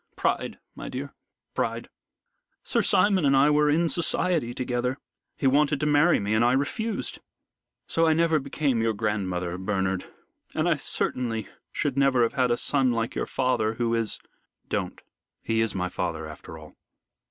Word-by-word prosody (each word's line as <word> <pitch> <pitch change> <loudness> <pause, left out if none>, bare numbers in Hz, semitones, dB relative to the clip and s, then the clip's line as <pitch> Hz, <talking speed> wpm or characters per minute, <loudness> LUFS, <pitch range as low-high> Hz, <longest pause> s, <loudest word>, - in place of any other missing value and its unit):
Pride, - - -1 0.2
my - - -7
dear - - -6 0.4
pride. - - -2 0.8
Sir - - +1
Simon 195 -4 +3
and 135 -1 +4
I 145 +2 +5
were 150 0 +4
in 165 +3 +3
society 165 -5 0
together. 125 +1 -2 0.4
He - - -3
wanted 145 +1 +3
to 150 - 0
marry 150 +3 +4
me, 105 +1 -1
and 110 +2 +3
I 120 +1 +4
refused. 210 - -2 0.7
So 165 0 +2
I 160 - +5
never 165 -1 +3
became 140 -3 0
your 115 0 +1
grandmother, 95 -5 -2
Bernard, 95 -1 -1 0.4
and - - +1
I - - +3
certainly 115 -4 -2 0.2
should 140 -2 -1
never 135 -3 +4
have 115 - 0
had 130 -3 +2
a 120 - +2
son 135 -2 +2
like 115 -1 -1
your - - -2
father, 115 -4 0
who 115 -1 0
is 115 -2 0 0.3
" - - -48
"Don't. - - -4 0.4
He 115 0 +1
is 115 -2 0
my 90 -1 -1
father - - -3
after 80 - -10
all." 75 -1 -13
125 Hz, 170 wpm, -26 LUFS, 110-150 Hz, 0.8 s, I